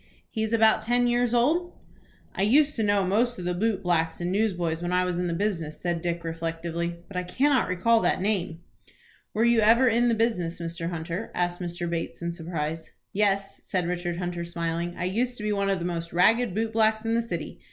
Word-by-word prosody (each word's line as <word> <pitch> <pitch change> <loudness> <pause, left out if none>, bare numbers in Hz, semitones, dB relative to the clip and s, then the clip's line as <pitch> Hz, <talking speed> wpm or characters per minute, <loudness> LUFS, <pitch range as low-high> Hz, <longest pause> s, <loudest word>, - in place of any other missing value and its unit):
"He 220 - -3
is 220 0 -1
about 220 -1 +4
ten 245 +2 +2
years 240 0 +2
old?" 310 +9 +2 0.6
"I - - -3
used 280 +9 +4
to 225 - -1
know 205 -2 +2
most 235 +6 +1
of 180 - -6
the 180 - 0
boot 200 +1 0
blacks 165 -2 0
and 175 +1 -2
newsboys 175 -6 0
when 175 0 -2
I 180 0 +2
was 180 -1 -1
in 180 - 0
the 170 - -1
business," 165 -6 -2
said 175 -2 -2
Dick, 170 0 -2
reflectively; 165 +1 -3
"but 200 - -12
I - - +1
cannot 260 +10 +2
recall 225 +6 +3
that - - +1
name." 185 -5 -1 0.7
"Were 220 - +2
you 235 -1 +4
ever 230 +4 +5
in 240 +1 +3
the 235 - +3
business, 195 -8 0
Mr. 170 0 -4
Hunter?" 170 +4 -4
asked 175 0 -1
Mr. 175 0 -3
Bates, 170 -1 -3
in 170 0 -3
surprise. 160 -2 -4 0.2
"Yes," 195 -1 0
said 180 -2 -2
Richard 175 -1 -2
Hunter, 175 -1 -3
smiling; 170 0 -3
"I - - -3
used 240 +7 -1
to 210 - -7
be 210 0 0
one 200 -1 0
of 195 - +2
the 175 - -4
most 170 -1 -4
ragged 215 +4 +3
boot 225 +1 -1
blacks 220 0 +2
in 225 - +1
the 230 - +2
city. 175 -9 -5
180 Hz, 215 wpm, -26 LUFS, 170-225 Hz, 0.7 s, ever